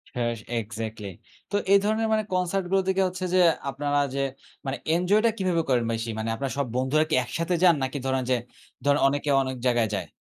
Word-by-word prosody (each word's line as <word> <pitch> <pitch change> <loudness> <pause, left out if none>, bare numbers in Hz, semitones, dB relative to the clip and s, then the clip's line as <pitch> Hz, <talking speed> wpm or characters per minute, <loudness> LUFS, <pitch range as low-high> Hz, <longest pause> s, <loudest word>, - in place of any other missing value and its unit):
হ্যাঁ 120 -1 0 0.3
এক্সাক্টলি। 110 -1 -6 0.4
তো - - -1 0.2
এই 200 - +7
ধরনের 220 +2 +1
মানে 215 0 +2
কনসার্ট 185 +1 0
গুলো 195 0 +4
থেকে 190 0 +2
হচ্ছে 185 0 -4
যে 185 - +4 0.3
আপনারা 145 +2 0 0.2
যে 140 - 0 0.4
মানে 135 +1 -2 0.2
এনজয় 190 +5 +3
টা 230 - +6
কিভাবে 185 -3 +1
করেন 125 -2 +3
বেশি? 115 +1 -3
মানে 110 +1 -2
আপনার 135 +2 -3
সব 140 - +1
বন্ধুরা 130 +5 +2
কি - - +2
একসাথে 165 +7 -2
যান? 175 -2 +7
নাকি 130 +2 -2
ধরেন 130 -1 0
যে 130 - +4 0.5
ধরেন 145 0 +4
অনেকে 145 +1 -1
অনেক 130 -1 -3
জায়গায় 120 -3 +2
যায়? - - -4
145 Hz, 200 wpm, -26 LUFS, 125-185 Hz, 0.5 s, এই